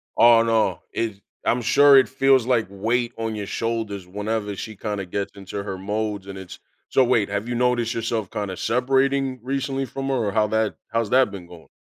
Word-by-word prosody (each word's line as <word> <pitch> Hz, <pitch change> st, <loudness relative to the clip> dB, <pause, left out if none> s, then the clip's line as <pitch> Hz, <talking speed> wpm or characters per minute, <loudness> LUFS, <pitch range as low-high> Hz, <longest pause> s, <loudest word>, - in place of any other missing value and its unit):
Aw, 115 Hz, -1 st, +6 dB
no, 115 Hz, -1 st, +1 dB
it 110 Hz, -4 st, -3 dB, 0.2 s
I'm 120 Hz, -, +2 dB
sure 140 Hz, +4 st, +6 dB
it 130 Hz, -, +4 dB
feels 135 Hz, -2 st, +3 dB
like 120 Hz, -4 st, +1 dB
weight 115 Hz, +5 st, -1 dB
on 115 Hz, -1 st, -3 dB
your 105 Hz, -1 st, -4 dB
shoulders 110 Hz, -5 st, -3 dB
whenever 105 Hz, +2 st, -3 dB
she 110 Hz, +2 st, -7 dB
kinda 105 Hz, -1 st, -4 dB
gets 100 Hz, +2 st, -3 dB
into 100 Hz, 0 st, -6 dB
her 100 Hz, -2 st, -5 dB
modes 105 Hz, 0 st, -3 dB
and 95 Hz, -1 st, -7 dB
it's 95 Hz, -2 st, -10 dB, 0.3 s
so 135 Hz, -, +4 dB
wait, 120 Hz, -5 st, +2 dB
have 100 Hz, +2 st, -3 dB
you 120 Hz, -, -2 dB
noticed 120 Hz, -1 st, +1 dB
yourself 115 Hz, -3 st, -2 dB
kinda 100 Hz, -3 st, -4 dB
separating 135 Hz, +1 st, +1 dB
recently 135 Hz, +1 st, -2 dB
from 135 Hz, +2 st, -5 dB
her 135 Hz, -, +1 dB
or 110 Hz, -5 st, 0 dB
how 110 Hz, -1 st, +2 dB
that 110 Hz, 0 st, 0 dB, 0.2 s
how's 115 Hz, -2 st, 0 dB
that 130 Hz, -5 st, +4 dB
been 90 Hz, -3 st, -9 dB
going? 85 Hz, -2 st, -14 dB
115 Hz, 200 wpm, -23 LUFS, 100-125 Hz, 0.3 s, Aw